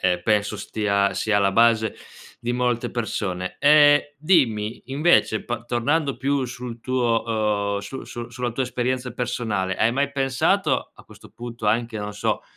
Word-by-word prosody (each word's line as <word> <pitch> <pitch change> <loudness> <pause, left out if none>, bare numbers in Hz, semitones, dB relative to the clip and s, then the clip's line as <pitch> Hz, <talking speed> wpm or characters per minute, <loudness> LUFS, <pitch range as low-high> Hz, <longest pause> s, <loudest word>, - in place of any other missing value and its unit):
eh 90 -1 +1
penso 105 0 +1
stia 100 -2 0
sia 110 -1 0
alla 100 -1 +2
base 115 0 +3 0.5
di 120 0 -2
molte 125 -1 0
persone. 95 -6 -3
Ehm, 145 0 +7 0.2
dimmi 125 - +1
invece 135 -5 +2
pa - - -4
tornando 135 +5 0
più 135 +1 0
sul 125 -1 -7
tuo, 115 -5 0
uhm, - - -1
su 115 +7 -7
su 120 0 -8
sulla 120 0 -3
tua 120 +4 -2
esperienza 125 0 -2
personale 110 -6 -2
hai 115 - +2
mai 140 +2 0
pensato 135 -2 0
a - - -17
questo - - -16
punto 120 -2 -7
anche, 115 +1 0
non 105 0 -5
so, - - -1
120 Hz, 160 wpm, -23 LUFS, 105-130 Hz, 0.5 s, Ehm